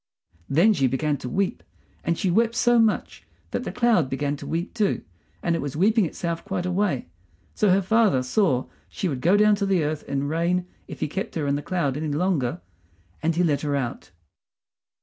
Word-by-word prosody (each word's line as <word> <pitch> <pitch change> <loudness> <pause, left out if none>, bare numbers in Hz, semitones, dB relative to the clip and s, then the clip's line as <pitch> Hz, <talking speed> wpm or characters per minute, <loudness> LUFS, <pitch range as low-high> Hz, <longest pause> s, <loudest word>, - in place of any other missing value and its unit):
Then 175 +10 +5
she 135 -8 +2
began 145 +3 0
to 125 - -6
weep; 195 +4 -1 0.4
and 170 0 0
she 185 - 0
wept 230 +4 +2
so 240 -1 +4
much 225 -2 0 0.3
that - - -2
the - - -3
cloud 235 - +2
began 145 +2 -1
to - - -9
weep 170 +3 -3
too, 210 -4 0 0.4
and 170 - +1
it 165 - -2
was 140 -1 -4
weeping 205 +3 +3
itself 170 +1 -4
quite 190 -3 -3
away. 180 -6 0 0.5
So 210 - +2
her 190 +1 +4
father 210 - +3
saw 130 - +1 0.2
she 190 - -3
would 135 -6 -3
go 180 +7 +4
down 210 0 +5
to 200 - 0
the 185 -4 +2
earth 150 0 -2
in 140 0 -1
rain 170 +3 0 0.2
if - - -9
he - - +1
kept 190 +6 -4
her 155 -3 -1
in 140 0 +1
the 145 - -2
cloud 145 -6 -1
any 155 +1 -3
longer, 145 - 0 0.6
and 160 +1 +1
he 180 - +2
let 150 -4 +1
her 145 -2 -1
out. 120 -9 -3
170 Hz, 205 wpm, -24 LUFS, 145-195 Hz, 0.6 s, Then